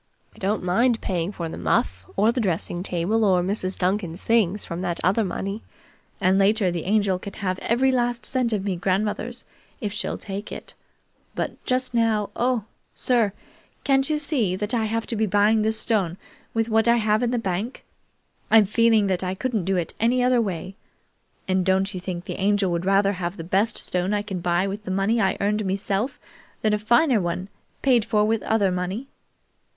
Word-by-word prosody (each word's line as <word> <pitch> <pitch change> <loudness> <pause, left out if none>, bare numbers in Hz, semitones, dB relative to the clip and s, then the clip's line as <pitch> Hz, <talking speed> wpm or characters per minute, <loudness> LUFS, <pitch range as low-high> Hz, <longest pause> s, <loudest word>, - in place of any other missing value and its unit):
I - - -16
don't 200 +2 -1
mind 230 +6 +2
paying 175 0 -2
for 170 -4 -5
the 160 - -7
muff, 90 +3 0
or 215 +3 +4
the 245 +1 -1
drexing 175 -2 -1
table, 185 +5 0
or 185 -4 +3
Mrs. 190 0 -1
Duncan's 180 -2 -1
things, 210 -4 +2
from 170 +1 -5
that 175 -2 -2
other 200 +6 +3
money, 195 +2 -4 0.6
and 190 +2 +3
later 200 -1 +3
the 170 -2 -4
Angel 200 -2 +2
can 200 +1 -8
have 185 -2 -3
every 260 +3 +2
last 240 -1 0
cent 255 -3 0
of 205 -3 -1
me 195 -2 0
grandmother's, 210 +6 -2 0.3
if 210 -6 -3
she'll 215 - -3
take 200 +1 -6
it; - - -8 0.6
but - - -4
just 255 0 0
now 225 -3 +1
oh, 245 -2 +1 0.3
sir, 235 -5 +2 0.5
can't 270 0 +2
you 305 - +1
see 270 - 0
that 210 +4 -3
I 225 -2 +1
have 225 +1 -1
to 230 - -3
be 220 0 +1
buying 205 +3 +3
this 220 +1 0
stone 190 -6 0 0.4
with 225 0 +1
what 225 0 +2
I 235 - +6
have 215 -2 +2
in 245 - +1
the 245 - 0
bank? 205 +3 -3 0.7
I'm 220 -2 +7
feeling 225 +1 +3
that 185 -2 0
I 185 0 -2
couldn't 220 -4 -2
do 190 -1 +1 0.2
any 245 +3 +2
other 250 -1 +3
way, 190 -3 -4 0.7
and 185 -1 +2
don't 190 +2 +1
you 185 - -4
think 180 -1 -5
the - - -5
Angel 200 -1 +2
would 170 +1 -1
rather 195 +1 +3
have 180 0 -4
the 165 - -6
best 200 +6 +1
stone 185 +3 -1
I 205 - -1
can 195 -3 -4
buy 175 +1 +1
with 200 +2 -5
the 185 - -7
money 195 +5 +1
I 190 -1 +1
earned 210 +1 0
meself 200 +6 -2 0.4
than 215 -1 +3
a 210 - +1
finer 235 +2 +3
one 175 +2 -3 0.3
paid 250 -4 +4
for 210 -2 +2
with 225 0 +1
other 205 -4 +1
money?" 185 +8 -3
205 Hz, 195 wpm, -24 LUFS, 185-225 Hz, 0.7 s, I'm